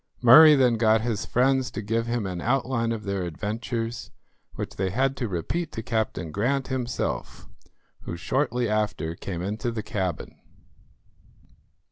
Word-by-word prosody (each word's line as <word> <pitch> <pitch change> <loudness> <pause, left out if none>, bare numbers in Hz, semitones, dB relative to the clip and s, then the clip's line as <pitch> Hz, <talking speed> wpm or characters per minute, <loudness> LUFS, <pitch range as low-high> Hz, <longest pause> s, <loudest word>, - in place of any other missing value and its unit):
Murray 150 +6 +9
then 125 -4 +3
got 110 0 +3
his 115 -2 -2
friends 130 +1 +2
to - - -5
give 115 +2 -1
him 120 -3 -1
an 90 -2 -4
outline 125 -1 0
of 110 -2 -4
their 100 -2 -2
adventures, 115 +7 -4 0.5
which - - -5
they 95 0 0
had 135 +7 0
to 120 - -2
repeat 110 - -3
to 115 - -5
Captain 110 -8 -2
Grant 130 - -1
himself, 125 -2 -3 0.6
who 85 - -5
shortly 125 - 0
after 105 -6 -1
came 85 0 -5
into 105 +5 -2
the 115 -2 -4
cabin. 95 -6 -4
115 Hz, 145 wpm, -25 LUFS, 100-125 Hz, 0.6 s, Murray